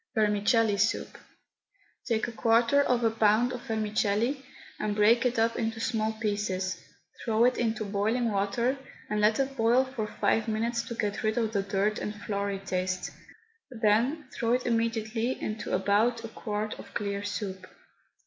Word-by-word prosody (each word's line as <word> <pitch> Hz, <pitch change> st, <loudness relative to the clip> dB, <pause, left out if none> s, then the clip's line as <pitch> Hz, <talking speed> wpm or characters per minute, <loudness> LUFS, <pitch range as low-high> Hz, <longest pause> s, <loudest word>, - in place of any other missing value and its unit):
VERMICELLI 210 Hz, 0 st, +3 dB
SOUP. 215 Hz, +3 st, 0 dB, 0.9 s
Take 225 Hz, -2 st, +1 dB
a -, -, -5 dB
quarter 230 Hz, +4 st, +3 dB
of 250 Hz, -3 st, +1 dB
a 225 Hz, -, +3 dB
pound 225 Hz, +3 st, +3 dB
of 245 Hz, -, -8 dB
vermicelli 220 Hz, +4 st, 0 dB, 0.4 s
and 210 Hz, -1 st, -1 dB
break 230 Hz, +4 st, +4 dB
it 245 Hz, -, -2 dB
up 225 Hz, +1 st, +2 dB
into 225 Hz, -1 st, -2 dB
small 220 Hz, -2 st, 0 dB
pieces, 205 Hz, -4 st, -2 dB, 0.4 s
throw 225 Hz, +1 st, +3 dB
it 250 Hz, -, +3 dB
into 220 Hz, -2 st, 0 dB
boiling 220 Hz, +4 st, 0 dB
water, 220 Hz, +7 st, 0 dB, 0.3 s
and 210 Hz, 0 st, +1 dB
let 215 Hz, +3 st, +3 dB
it 270 Hz, 0 st, -1 dB
boil 240 Hz, +2 st, +3 dB
for 255 Hz, -5 st, -4 dB
five 220 Hz, +1 st, 0 dB
minutes 230 Hz, +2 st, 0 dB
to 235 Hz, 0 st, -7 dB
get 210 Hz, -1 st, -2 dB
rid 215 Hz, -1 st, 0 dB
of 225 Hz, -2 st, 0 dB
the 200 Hz, -, +2 dB
dirt 200 Hz, +2 st, 0 dB
and 210 Hz, -, -4 dB
floury 200 Hz, -1 st, -3 dB
taste, 185 Hz, -1 st, -2 dB, 0.6 s
then 245 Hz, +5 st, +1 dB
throw 230 Hz, 0 st, 0 dB
it 250 Hz, 0 st, 0 dB
immediately 230 Hz, +1 st, 0 dB
into 215 Hz, 0 st, -4 dB
about 215 Hz, +5 st, +2 dB
a -, -, -7 dB
quart 215 Hz, -1 st, -4 dB
of -, -, -12 dB
clear 200 Hz, -1 st, -2 dB
soup. 200 Hz, -2 st, -5 dB
220 Hz, 160 wpm, -28 LUFS, 205-235 Hz, 0.9 s, break